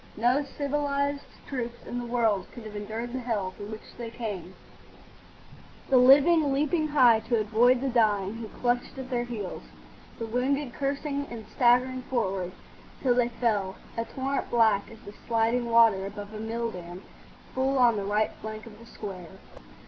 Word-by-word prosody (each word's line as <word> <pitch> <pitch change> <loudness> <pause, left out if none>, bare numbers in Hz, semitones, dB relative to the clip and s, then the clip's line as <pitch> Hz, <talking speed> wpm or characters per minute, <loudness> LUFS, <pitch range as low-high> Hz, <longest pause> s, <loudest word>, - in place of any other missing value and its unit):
No 245 +6 +3
civilised 285 0 -2 0.2
troops 240 -3 -5
in 245 - -4
the 240 - -5
world 225 -5 +1
could 240 - -10
have 215 -1 -8
endured 220 +4 -5
the 260 - -2
hell 215 -6 -2
through 205 - -9
which 215 0 -10
they 235 -1 -4
came, 205 -6 -6 1.4
the 260 - +7
living 285 +4 +6
leaping 305 +3 +1
high 250 -7 +5
to 235 -2 +3
avoid 235 +4 +3
the 270 - 0
dying 210 -5 +2
who 225 -1 -6
clutched 245 +4 -2
at 265 0 -7
their 240 -1 0
heels, 215 -6 -5 0.6
the 230 - -4
wounded 250 +3 -1
cursing 285 0 -2
and 230 -2 -8
staggering 255 +1 +3
forward, 195 -8 -2 0.5
till 255 -3 +4
they 240 -1 +2
fell—a 225 -1 -2
torrent 270 +2 -3
black 220 -4 +3
as 225 - -12
the 205 - -11
sliding 235 +1 +1
water 225 -4 +5
above 205 +1 -8
a 215 - -6
mill 230 +1 -2
dam—full 185 +9 -5
on 240 -3 +5
the 205 - -2
right 210 +2 +1
flank 215 0 -6
of 215 -2 -13
the 230 - -14
square. 185 -7 -8
235 Hz, 165 wpm, -27 LUFS, 215-255 Hz, 1.4 s, the